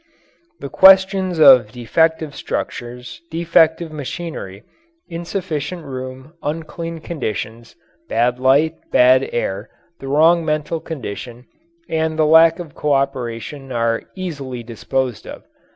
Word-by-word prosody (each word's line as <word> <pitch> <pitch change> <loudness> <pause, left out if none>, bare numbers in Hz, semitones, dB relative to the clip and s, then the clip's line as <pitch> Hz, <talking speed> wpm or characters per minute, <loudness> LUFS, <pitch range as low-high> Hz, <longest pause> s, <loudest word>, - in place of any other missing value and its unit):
The 140 - -7
questions 190 0 +5
of 130 -8 +7
defective 160 +5 0
structures, 125 +1 -6
defective 165 0 +2
machinery, 145 - -7 0.4
insufficient 170 -2 -5
room, 130 +2 -8
unclean 165 +2 -5
conditions, 115 - -5 0.3
bad 125 +1 +1
light, 140 +5 +3 0.2
bad 130 +1 +4
air, 100 -2 -3 0.3
the 135 - -8
wrong 165 +4 +4
mental 155 +1 -2
condition, 125 -5 -7 0.4
and 160 0 -1
the 155 - +3
lack 160 +1 +6
of 170 -5 -9
cooperation 135 -1 -2
are 115 -1 0
easily 140 -10 -6
disposed 125 +1 -3
of. - - -9
145 Hz, 105 wpm, -19 LUFS, 125-165 Hz, 0.4 s, of